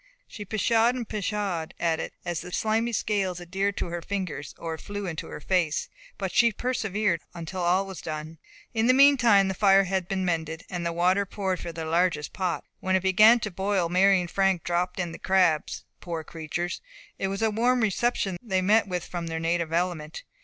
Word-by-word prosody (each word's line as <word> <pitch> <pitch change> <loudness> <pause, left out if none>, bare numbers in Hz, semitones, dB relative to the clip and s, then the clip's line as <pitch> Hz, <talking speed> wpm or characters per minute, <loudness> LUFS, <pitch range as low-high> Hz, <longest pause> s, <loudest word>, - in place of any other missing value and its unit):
She 205 - -8
pshawed 225 +4 +2
and 240 -3 -4
pshawed 200 -5 -3
at 165 -2 +1
it - - -5
as 175 -2 -2
the 180 - -9
slimy 225 +4 0
scales 195 -5 -1
adhered 195 +3 -2
to - - -1
her 170 0 -4
fingers, 180 -6 -4
or 165 -1 -4
flew 205 0 -5
into 165 -4 -5
her - - -7
face, 170 -2 0 0.3
but 190 -2 -3
she 235 -1 +4
persevered 210 -7 -1
until 175 +2 -5
all 180 +3 +2
was 190 -2 -8
done. 155 0 -6 0.3
In 225 0 +1
the 255 - +5
meantime 245 -8 +6
the 190 - -1
fire 195 0 +5
had 190 -1 -2
been 190 -1 -1
mended, 160 -1 -2
and 175 -1 -2
water 185 +3 +2
poured 190 -2 -2
into 170 - -6
their 165 -1 -5
largest 165 -1 0
pot. 185 -3 -2 0.2
When 190 0 0
it 190 - +1
began 215 +5 +6
to 210 - -3
boil, 190 -1 0
Mary 190 +2 +4
and 175 -1 -4
Frank 195 -3 +1
dropped 175 +1 -1
in 175 -2 -2
the - - -9
crabs. 180 -5 +1 0.2
Poor 165 -2 -5
creatures! 165 +2 -4 0.4
it 195 - 0
was 195 +3 -3
a 220 - +2
warm 245 +3 +2
reception 210 -3 0
they 190 -5 0
met 210 +2 +4
with 180 -2 -3
from 175 -2 -5
their 160 0 -3
native 165 0 -1
element. 165 -3 -2
185 Hz, 195 wpm, -26 LUFS, 170-205 Hz, 0.4 s, meantime